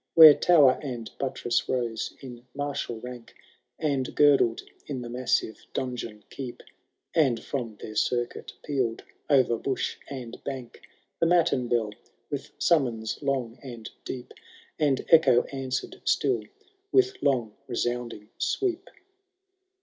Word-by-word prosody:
Where 160 -2 +12
tower 145 -6 +5
and 120 -6 -5
buttress 130 -3 -1
rose 120 -3 -2
in 125 -2 -10
martial 145 -5 -3
rank. 125 -1 -9 0.4
And 140 -4 -1
girdled 140 -6 +4 0.2
in 130 -4 -4
the 120 - -7
massive 125 -2 0
donjon 115 -5 -4
Keep, 130 -3 -7 0.5
And 130 -8 +2
from 120 -6 -4
their 110 - -7
circuit 120 +2 -1 0.2
peaVd 130 -6 0 0.3
o*er 130 -5 +4
bush 135 - -2
and 125 -4 -7
bank 130 -4 -6 0.4
The 165 - +3
matin 165 -8 +3
bell 115 -3 +1 0.4
with - - -4
summons 120 -9 +1
long 130 -4 -1
and 120 -5 -8
deep. 125 -2 -7 0.5
And 145 -4 +2
echo 140 -7 +6
answered 130 -1 -3
still 125 -6 +1 0.5
with 390 0 +3
long 120 -7 +1
resounding 120 -3 -3
sweep. 375 -4 -1
125 Hz, 120 wpm, -27 LUFS, 120-140 Hz, 0.5 s, Where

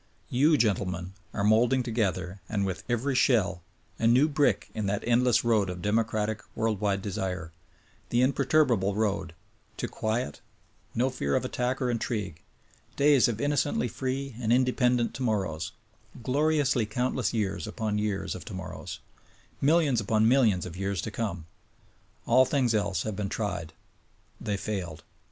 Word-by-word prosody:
You, 150 +5 +4
gentlemen, 95 -5 0 0.2
are 100 - -2
moulding 115 +5 +4
together, 100 -5 -2
and 100 -2 0
with 95 -2 -4
every 120 +4 0
shell, 105 -9 +2 0.4
a 115 - +2
new 125 +6 +5
brick 145 -2 +1
in 105 -2 -2
that 100 +1 -1
endless 120 0 +3
road 110 -5 +3
of 90 -1 -6
democratic, 110 0 0
world 110 -2 -1
wide 100 -2 0
desire: 90 -4 -3 0.6
Th 120 +1 +3
imperturbable 130 -7 +2
road 100 -6 -1 0.4
to - - -2
quiet, 110 -8 -2 0.5
no 130 +3 +1
fear 70 - -1
of - - 0
attack 125 +2 -1
or 125 -2 0
intrigue, 105 -8 -3 0.5
days 140 -3 +5
of 115 -2 -2
innocently 145 -2 +1
free 135 +1 -3
and 115 -1 0
independent 125 -1 +2
tomorrows; 95 -11 -2 0.5
gloriously 140 -3 +2
countless 125 +3 -1
years 100 -2 -2
upon 105 -1 -2
years 105 -2 -2
of - - -8
tomorrows: - - -7 0.6
Millions 145 -5 +3
upon 110 +1 +2
millions 115 -8 +3
of 90 -2 -7
years 95 0 -2
to 110 - -4
come. 95 -8 -3 0.8
All 130 +2 +5
things 130 -3 +1
else 100 -4 0
have 110 -2 -3
been 100 -1 -3
tried. 90 -8 -3 0.7
They 100 -1 -2
failed. 90 -7 -4
110 Hz, 145 wpm, -28 LUFS, 100-125 Hz, 0.8 s, new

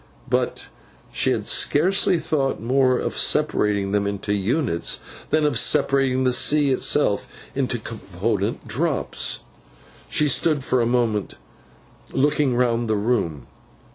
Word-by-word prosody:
But, - - -1 0.5
she - - +1
had - - -1
scarcely 180 +4 +3
thought 150 -4 -1
more 130 +2 +2
of - - -3
separating 100 -2 +1
them 100 0 0
into 100 0 -3
units, 100 - -1 0.3
than 155 -1 +2
of 145 -6 +2
separating 135 -3 +2
the 130 -1 +2
sea 145 +2 +3
itself 130 -5 +1 0.3
into 130 -3 -1
its 110 - -15
component 105 +1 -3
drops. 145 +8 -1 0.7
She 150 - +1
stood 145 0 +1
for 130 -2 +1
some 115 - +1
moments 115 -4 0 0.8
looking 145 -1 +1
round 120 -1 +1
the 110 - +2
room. 100 - -1
125 Hz, 130 wpm, -22 LUFS, 105-140 Hz, 0.8 s, scarcely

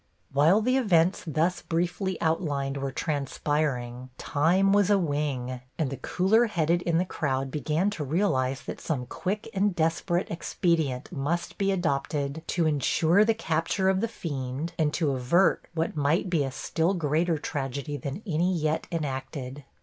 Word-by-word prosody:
While 160 +10 +5
the 255 +4 +2
events 185 -7 +3
thus 160 +4 0
briefly 175 +3 -1
outlined 145 -4 0
were 135 0 -3
transpiring 140 -4 -2
time 180 +6 +2
was 205 -1 +4
a 205 - +5
wing, 145 -7 -2 0.2
and 150 -5 -1
the 135 - -4
cooler 215 +6 +2
headed 170 -3 +1
in 170 -2 +1
the 180 - +2
crowd 135 -6 -2
began 155 +6 0
to 175 -7 -4
realize 135 -5 0
that - - -7
some 135 -6 -2
quick 200 - -3
and 200 -1 +1
desperate 170 +2 0
expedient 160 -5 -1
must 165 +2 -2
be 195 0 +2
adopted 145 -3 -1
to 170 -2 +1
insure 160 +5 +3
the 225 +1 +2
capture 175 0 0
of 190 0 +2
the 230 - +1
fiend 145 - -4
and 155 -2 +2
to 155 -5 +1
avert 135 +9 +2
what 165 0 -1
might 155 +5 +1
be 160 -5 +2
a 135 - -2
still 165 +7 0
greater 165 +1 +1
tragedy 140 0 -4
than 145 +7 -5
any 175 0 +1
yet 155 -1 -1
enacted. 135 -3 -4
160 Hz, 155 wpm, -27 LUFS, 140-180 Hz, 0.2 s, While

